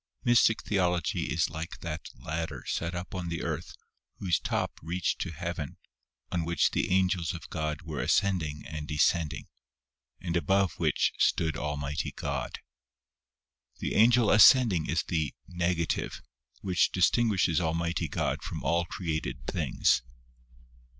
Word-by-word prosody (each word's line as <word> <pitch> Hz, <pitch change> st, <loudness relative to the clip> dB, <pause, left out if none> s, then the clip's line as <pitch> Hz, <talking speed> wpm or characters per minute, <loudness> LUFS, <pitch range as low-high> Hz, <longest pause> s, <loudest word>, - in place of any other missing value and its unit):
MYSTIC 120 Hz, -2 st, +4 dB
THEOLOGY 90 Hz, -5 st, 0 dB
is -, -, +1 dB
like 80 Hz, +2 st, -6 dB
that 85 Hz, -1 st, -5 dB
ladder 80 Hz, +1 st, -4 dB
set 85 Hz, +2 st, -2 dB
up 90 Hz, +1 st, -6 dB
on 90 Hz, -2 st, -3 dB
the 85 Hz, -1 st, -3 dB
earth -, -, -4 dB, 0.4 s
whose 90 Hz, -4 st, +1 dB
top -, -, -2 dB
reached 85 Hz, +3 st, -2 dB
to -, -, -2 dB
Heaven 85 Hz, -2 st, -5 dB, 0.5 s
on 85 Hz, -2 st, 0 dB
which 85 Hz, -1 st, +2 dB
the -, -, 0 dB
angels 90 Hz, -2 st, +1 dB
of 85 Hz, -, -10 dB
God 75 Hz, -1 st, -3 dB
were 80 Hz, -3 st, -5 dB
ascending 80 Hz, -7 st, 0 dB
and 75 Hz, -1 st, -6 dB
descending, 75 Hz, +1 st, +1 dB, 0.7 s
and 85 Hz, 0 st, -3 dB
above 95 Hz, -1 st, +1 dB
which -, -, +2 dB
stood 80 Hz, -1 st, +2 dB
Almighty 75 Hz, 0 st, -3 dB
God. -, -, -4 dB, 1.2 s
The -, -, -3 dB
Angel 115 Hz, 0 st, +5 dB
ascending 105 Hz, -5 st, +6 dB
is -, -, +1 dB
the 80 Hz, -3 st, -2 dB
" -, -, -41 dB
negative 85 Hz, -1 st, -1 dB, 0.2 s
" 60 Hz, -1 st, -34 dB
which 90 Hz, -3 st, +2 dB
distinguishes 95 Hz, -3 st, +2 dB
Almighty 85 Hz, 0 st, -1 dB
God 70 Hz, -, -2 dB
from -, -, -6 dB
all 85 Hz, +5 st, +1 dB
created 80 Hz, -8 st, -4 dB
things. -, -, +1 dB
85 Hz, 135 wpm, -29 LUFS, 80-90 Hz, 1.2 s, ascending